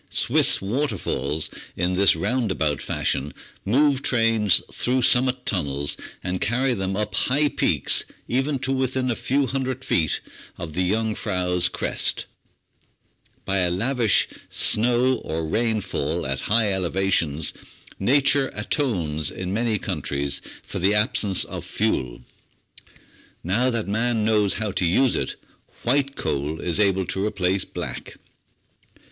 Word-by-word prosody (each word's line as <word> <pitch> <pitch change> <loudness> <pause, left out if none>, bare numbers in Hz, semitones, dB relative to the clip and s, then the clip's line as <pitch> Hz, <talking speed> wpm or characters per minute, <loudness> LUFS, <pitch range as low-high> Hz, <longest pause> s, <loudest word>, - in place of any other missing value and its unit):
Swiss - - +3
waterfalls, 95 - -1 0.3
in 90 +1 0
this 95 -1 +4
roundabout 90 - -1
fashion, 70 +3 -2 0.3
move 135 +5 +2
trains 115 -6 +3
through 125 +1 0
sum 125 +1 +6
mit 130 -1 -2
tunnels, 70 -7 -1 0.3
and 90 0 -3
carry 125 +4 +1
them 95 -2 -2
up 105 0 -2
high 145 +4 +2
peaks - - +1 0.2
even 135 +3 0
to 135 +1 -2
within 130 -1 0
a - - -1
few 135 +4 0
hundred 130 0 -3
feet 80 -2 +1 0.4
of 80 -2 -7
the 90 +2 0
Jungfrau's 95 -5 0
crest. - - 0 1.2
By 95 0 +1
a 90 -1 +2
lavish 115 +5 +2 0.2
snow 125 +3 +2
or 80 0 -4
rain 110 +5 0
fall 80 0 -3
at 65 0 -2
high 105 -1 +3
elevations, 85 -5 0 0.5
nature 140 +5 +3
atones 90 - -1
in 90 0 -5
many 115 0 0
countries 70 -7 -2 0.2
for - - -6
the 100 +4 +2
absence 105 -3 +3
of - - -7
fuel. - - -2 1.2
Now 110 +9 +1
that 115 -4 -2
man 110 +1 0
knows 105 -2 +2
how 110 -2 -2
to 95 - -2
use 115 +10 +3
it, - - -2 0.5
"white 140 +2 +1
coal" 75 +2 -2
is 90 +2 0
able 95 -2 +2
to 95 - -3
replace 95 -2 0
black. - - -7
105 Hz, 130 wpm, -23 LUFS, 90-125 Hz, 1.2 s, sum